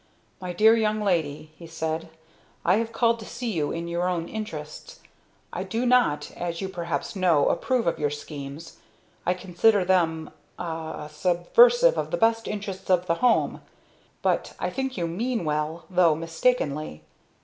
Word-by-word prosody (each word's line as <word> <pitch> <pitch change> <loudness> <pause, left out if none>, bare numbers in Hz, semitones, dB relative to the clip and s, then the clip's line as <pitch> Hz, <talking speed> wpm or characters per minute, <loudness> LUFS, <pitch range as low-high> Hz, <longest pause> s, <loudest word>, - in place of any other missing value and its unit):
"My 180 -1 -4
dear 220 +6 +5
young 215 -1 +1
lady," 155 -5 -1
he 170 - -10
said, 160 0 -3 0.6
"I 185 +4 +4
have 225 0 -2
called 230 0 +2
to 220 - -9
see 240 -2 -4
you 155 -6 -1
in 170 0 -4
your 175 +1 -1
own 170 -2 -2
interests. 210 - -7 0.5
I - - -3
do 235 +2 -2
not, 245 -12 +2
as 170 -1 -4
you 190 - -3
perhaps 175 0 -4
know, 175 -6 +3
approve 255 -3 0
of 170 - 0
your 150 -1 +1
schemes. 145 +1 -8 0.5
I 180 - +3
consider 185 +2 +2
them 165 -4 +1 0.3
ah 160 -3 -5
subversive 470 - +4
of - - -3
the - - -1
best 225 0 +2
interests 195 -2 -5
of 180 -1 +3
the 170 - +1
home! 250 -2 +2 0.6
But - - 0
I - - -2
think 265 -2 -3
you 170 -2 -1
mean 225 +3 -2
well, 155 +2 -2
though 175 -3 +4
mistakenly. 160 - -1
175 Hz, 160 wpm, -25 LUFS, 160-220 Hz, 0.6 s, dear